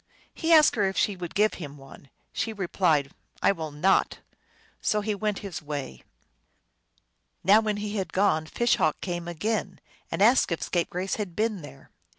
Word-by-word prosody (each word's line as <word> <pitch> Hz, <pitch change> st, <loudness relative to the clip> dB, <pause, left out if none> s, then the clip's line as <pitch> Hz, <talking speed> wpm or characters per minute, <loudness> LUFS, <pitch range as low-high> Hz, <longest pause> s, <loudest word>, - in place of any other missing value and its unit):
He 330 Hz, 0 st, -1 dB
asked 310 Hz, -2 st, +7 dB
her 205 Hz, -, +3 dB
if 190 Hz, -, -7 dB
she 205 Hz, -, +2 dB
would 175 Hz, -2 st, -7 dB
give 215 Hz, +1 st, +3 dB
him 145 Hz, -2 st, -7 dB
one. 135 Hz, 0 st, -15 dB, 0.2 s
She 225 Hz, -, -2 dB
replied, 170 Hz, -7 st, +1 dB, 0.2 s
" -, -, -20 dB
I -, -, +6 dB
will 160 Hz, -5 st, -4 dB
not." 150 Hz, +7 st, +2 dB, 0.6 s
So 210 Hz, -, +1 dB
he 210 Hz, +1 st, -1 dB
went 205 Hz, 0 st, -2 dB
his 185 Hz, -4 st, -5 dB
way. 145 Hz, -, -6 dB, 1.4 s
Now 200 Hz, +4 st, +6 dB
when 215 Hz, -2 st, -1 dB
he 210 Hz, +1 st, -4 dB
had 190 Hz, -, -3 dB
gone 185 Hz, -5 st, +2 dB
Fish 240 Hz, +8 st, +1 dB
Hawk 155 Hz, -, +1 dB
came 175 Hz, -2 st, -4 dB
again, 195 Hz, +3 st, -2 dB, 0.3 s
and 165 Hz, +4 st, +1 dB
asked 240 Hz, -2 st, +4 dB
if 170 Hz, -, -2 dB
Scapegrace 180 Hz, +2 st, -2 dB
had 200 Hz, -6 st, -5 dB
been 215 Hz, -2 st, -1 dB
there. 135 Hz, -2 st, -13 dB
190 Hz, 175 wpm, -26 LUFS, 160-210 Hz, 1.4 s, asked